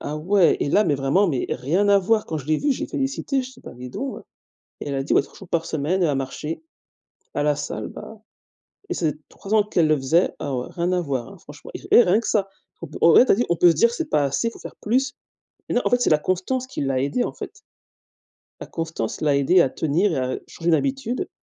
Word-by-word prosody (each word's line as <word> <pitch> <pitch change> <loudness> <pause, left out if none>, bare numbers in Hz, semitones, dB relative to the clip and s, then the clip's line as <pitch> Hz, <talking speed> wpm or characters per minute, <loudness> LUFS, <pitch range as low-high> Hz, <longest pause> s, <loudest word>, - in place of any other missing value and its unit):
Ah 150 - -4
ouais 180 +4 +3
et - - 0
là 210 +8 +3
mais 150 - +2
vraiment, 140 +9 +2
mais 135 -7 -1
rien 165 +11 0
à 200 0 +6
voir. 215 +3 +1
Quand 160 - -3
je 145 - -10
l'ai 155 0 +1
vu, 290 - +1
je - - -6
l'ai - - -2
félicité, 270 0 -2
je 255 - -9
dit 250 - -17
«bah - - -10
dis 125 0 -9
donc» 275 - -5 0.6
et - - -5
elle 140 - -3
a 135 - -1
dit 135 - -3
«ouais - - +5
3 - - -18
jours 195 - -12
par 165 -1 -1
semaine», 160 +5 -1
elle 170 - +3
a 145 - +1
marché 135 - -4 0.7
à 145 - -1
la 150 -1 +2
salle, - - -5
bah 220 -1 -11 0.7
et - - 0
ces 155 -4 0 0.2
3 200 +2 -7
ans 215 - +5
qu'elle 175 -6 +1
le 155 - +4
faisait, 155 +7 +2
ah 140 - -4
ouais, 125 - -3
rien 175 +1 -1
à 180 - +1
voir 140 +5 -4
franchement 145 0 -12
et - - -6
et - - +9
rien 190 +2 +3
que 230 - -5
ça. 200 -3 +1 0.5
On 165 - +6
ouais 250 - +8
tu - - +3
as - - +5
dit, 245 - 0
on 170 - +2
peut 175 +2 +5
se - - -3
dire 235 +9 +3
c'est 325 +4 -4
pas 145 - +2
assez, 140 - -1
il 230 - -2
faut - - -14
faire - - -10
plus, 260 +6 0 0.6
mais - - -2
non, 245 - +3
en - - +1
fait 245 - +3
c'est 245 - +2
la 155 - +5
constance 190 - -2
qui - - -6
l'a 135 -1 0
aidé 140 - 0
en - - -4
fait - - -9 1.0
la - - -6
constance 165 -9 -4
l'a 145 -2 +2
aidé 155 +6 +4
à 135 - +2
tenir 165 +8 0
et - - -1
à 130 0 -2
changer 170 +1 -3
une 165 - +4
habitude 270 - -2
170 Hz, 265 wpm, -23 LUFS, 145-215 Hz, 1.0 s, et